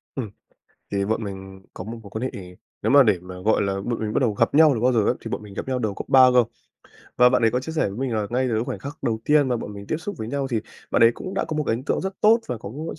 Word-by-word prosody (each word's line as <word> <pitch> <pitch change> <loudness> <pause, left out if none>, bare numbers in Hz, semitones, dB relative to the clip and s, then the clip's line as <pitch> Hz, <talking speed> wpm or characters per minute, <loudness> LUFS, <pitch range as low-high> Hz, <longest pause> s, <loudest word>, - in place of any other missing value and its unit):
Ừm. 115 -7 -4 0.6
Thì 100 0 0
bọn 110 +1 -1
mình 95 -1 -8
có 90 - -7
một 115 +2 -7
mối 100 - -12
quan 110 +3 -5
hệ 90 -2 -10 0.3
nếu 110 - +1
mà 140 0 +8
để 105 -6 +2
mà 90 0 -9
gọi 110 -1 +3
là 100 -1 -1
bọn 120 +3 -3
mình 110 -1 -2
bắt - - +2
đầu 120 -5 +2
gặp 115 +6 0
nhau 155 0 +7
từ 110 - -2
bao 125 +1 +3
giờ 115 - +3
ấy, - - +2
thì 115 - -7
bọn - - -3
mình 100 -2 -11
gặp - - -5
nhau 130 -1 0
đầu 110 -4 -2
cấp - - -6
3 130 -1 +7
cơ. 125 -2 +5 0.7
Và 125 0 +7
bạn 125 - +2
ấy 115 - +3
có 125 - +1
chia 145 +5 -6
sẻ 160 - -1
với 100 - -8
mình 130 -3 -2
là 105 -2 -1
ngay 130 +2 0
từ 115 - -1
cái 110 +2 +1
khoảnh - - -5
khắc 140 +3 -9
đầu 110 -1 0
tiên 150 -2 +4
mà 125 -2 0
bọn 105 - -7
mình 100 0 -9
tiếp 155 - -1
xúc 190 +3 -6
với 110 - -5
nhau 140 +1 -2
thì 115 -4 -1 0.3
bạn - - +2
ấy 115 - +7
cũng 185 - -7
đã - - -1
có 155 - -3
một 150 - 0
cái 115 - 0
ấn 125 - -7
tượng - - -1
rất 190 0 -3
tốt 225 +2 +6
và 120 - -3
có 100 - -8
một 155 +7 -6
115 Hz, 335 wpm, -23 LUFS, 105-135 Hz, 0.7 s, mà